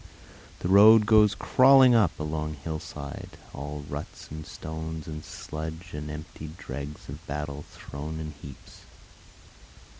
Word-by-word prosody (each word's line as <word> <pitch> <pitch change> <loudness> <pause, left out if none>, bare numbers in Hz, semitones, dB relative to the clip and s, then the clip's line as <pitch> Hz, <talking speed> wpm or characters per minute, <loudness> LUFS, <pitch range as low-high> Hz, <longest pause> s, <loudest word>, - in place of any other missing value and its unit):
The - - -1
road 105 +3 +8
goes 110 -1 +5
crawling 130 -1 +6
up 105 -8 +3
a - - -2
long 75 0 -3
hillside, 75 -2 -6 0.2
All 75 +1 -6
ruts 75 +1 -7
and 75 0 -7
stones 80 0 -6
and 75 -1 -7
sludge, 80 +3 -7
and 75 0 -5
the - - -5
emptied 75 +1 -9
dregs 70 +3 -7
Of 75 +4 -8
battle 75 0 -4
thrown 75 +3 -7
in 75 -1 -5
heaps. 70 -3 -12
75 Hz, 140 wpm, -27 LUFS, 75-85 Hz, 0.2 s, road